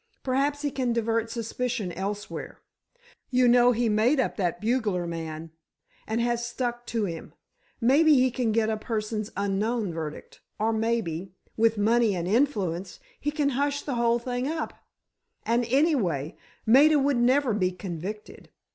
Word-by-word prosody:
Perhaps 280 +3 0
he 290 - 0
can 255 -3 -1
divert 230 0 0
suspicion 230 -2 -3
elsewhere—you 245 - -4
know 245 0 +6
he 240 0 +1
made 225 +7 +3
up 260 - 0
that 180 -5 -1
bugler 215 -6 0
man, 165 -1 -6 0.6
and 220 +1 -1
has 235 0 0
stuck 240 0 -3
to 225 -2 -1
him—maybe 260 - 0
he 255 -1 +3
can 240 -3 0
get 220 0 +2
a 220 0 -1
persons 215 -1 -3
unknown 200 0 -1
verdict—or 165 +7 -5
maybe, 200 -6 -2 0.2
with 225 0 +2
money 220 0 +3
and 175 -1 -3
influence, 195 - 0 0.2
he 295 - -1
can 295 -1 0
hush 285 +2 -1
the 280 - -3
whole 235 -1 +2
thing 245 +2 -3
up—and, 245 -6 -5
anyway—Maida 260 - +2
would 280 -1 +2
never 255 +1 +3
be 185 -3 +1
convicted. 185 +3 -7
230 Hz, 135 wpm, -26 LUFS, 205-255 Hz, 0.6 s, know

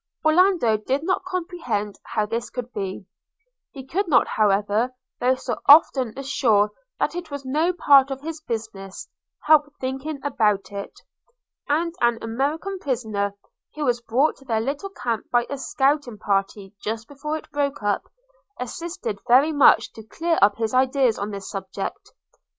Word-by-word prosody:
Orlando 320 - +4
did 265 +7 -2
not 370 +2 0
comprehend 340 - -3
how 215 -2 -1
this 230 +2 -3
could 250 0 -6
be 195 -1 -4 0.3
– - - -52
he 270 -2 -9
could 380 +8 -1
not, 255 -7 +4
however, 210 +4 +1 0.2
though 255 +1 +3
so - - -4
often 270 -6 +6
assured 235 -7 +2 0.3
that - - 0
it 350 -1 -6
was 285 -2 -6
no 310 +7 +1
part 280 -6 +5
of 270 -1 -4
his 320 +1 -6
business, 220 -7 -6 0.4
help 300 -1 +5
thinking 270 +3 -4
about 210 -9 +1
it; 200 0 -7 0.7
and 330 +3 +1
an 240 -1 +3
American 295 +12 -2
prisoner, 215 - -2 0.4
who 300 -1 -2
was 240 -2 +1
brought 255 +6 +1
to 270 - -19
their 225 -4 0
little 280 - -3
camp 235 - -4
by 240 -1 +2
a 280 - -2
scouting 270 -3 0
party 195 0 -2
just 225 +1 -4
before 300 +2 -4
it 315 - -13
broke 285 -3 -2
up, 205 0 0 0.5
assisted 250 - -5
very 265 +6 +5
much 290 -3 +5
to 220 - -10
clear 330 +10 -1
up 200 0 +5
his 225 0 -2
ideas 260 -2 +2
on 200 +1 -3
this 200 -2 -7
subject. 195 - -6
260 Hz, 160 wpm, -23 LUFS, 220-300 Hz, 0.7 s, often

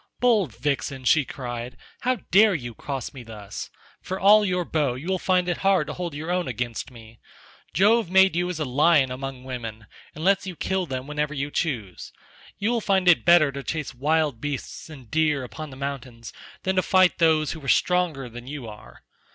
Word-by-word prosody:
"Bold 215 - +2
vixen," 140 -2 -2
she 150 +2 +4
cried, 120 -2 -6 0.2
"how 255 +1 +1 0.2
dare 205 +1 +6
you 120 -6 -5
cross 135 +2 -5
me 135 - -9
thus? 105 -3 -8 0.3
For 190 +1 -5
all 210 +2 +6
your 180 -3 0
bow 145 -7 0
you 140 +7 -8
will 190 -1 0
find 180 -1 +1
it 175 - 0
hard 195 -5 +2
to - - -6
hold 175 -4 -5
your 160 +4 -4
own 180 -3 0
against 120 0 -4
me. 115 -2 -15 0.6
Jove 215 +1 +4
made 190 -1 +5
you 175 +1 0
as 175 -3 -4
a 155 - -1
lion 140 +1 +3
among 130 0 -6
women, 115 -4 -6 0.3
and 155 - -7
lets 195 +1 +2
you 185 - -5
kill 190 +1 -1
them 130 -2 -4
whenever 150 +1 -2
you 140 +1 -3
choose. 115 - -3 0.5
You 210 +4 0
will 235 -2 0
find 190 -3 +1
it 175 - +6
better 170 -4 +6
to 140 0 -6
chase 150 0 -4
wild 150 -1 0
beasts 145 +2 -5
and 135 -7 -12
deer 150 -3 +1
upon 155 +5 -8
the 130 - -11
mountains 130 -4 -6 0.3
than 190 0 -1
to - - +5
fight 185 +3 +3
those 160 -3 +3
who 160 -3 -8
are - - -8
stronger 170 -4 +1
than 120 +1 -10
you 140 -4 -6
are. 105 -1 -13
150 Hz, 200 wpm, -24 LUFS, 130-180 Hz, 0.6 s, dare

